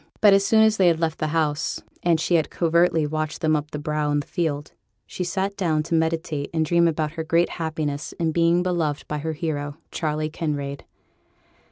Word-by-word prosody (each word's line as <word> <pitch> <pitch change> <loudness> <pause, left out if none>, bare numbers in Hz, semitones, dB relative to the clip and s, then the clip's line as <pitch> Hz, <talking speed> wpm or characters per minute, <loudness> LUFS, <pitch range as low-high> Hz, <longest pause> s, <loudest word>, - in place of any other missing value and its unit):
But 205 -2 +7
as 195 0 +4
soon 220 +2 +5
as 220 0 +3
they 185 - +4
had 165 -2 +3
left 165 -1 -1
the 155 - 0
house, 155 -1 0 0.2
and 170 -2 +2
she 175 - 0
had 165 -2 +3
covertly 170 -1 +2
watched 155 +1 -3
them 155 -1 +3
up 150 0 -2
the 150 - -5
brow 150 0 -1
in 145 0 +2
the 145 - -5
field, 150 -5 -2 0.3
she 180 - -5
sate 195 +2 -2
down 160 -6 0
to 165 - -5
meditate 160 -3 0
and 160 -1 +2
dream 170 +1 +3
about 155 -2 -1
her 160 0 -4
great 165 +2 +2
happiness 155 -2 -3
in 165 -1 -1
being 170 +2 +3
beloved 165 -5 -1
by 150 - -3
her 160 +2 -3
hero, 145 -2 -3
Charley 155 -1 -2
Kinraid. 145 -3 -3
160 Hz, 205 wpm, -24 LUFS, 150-170 Hz, 0.3 s, But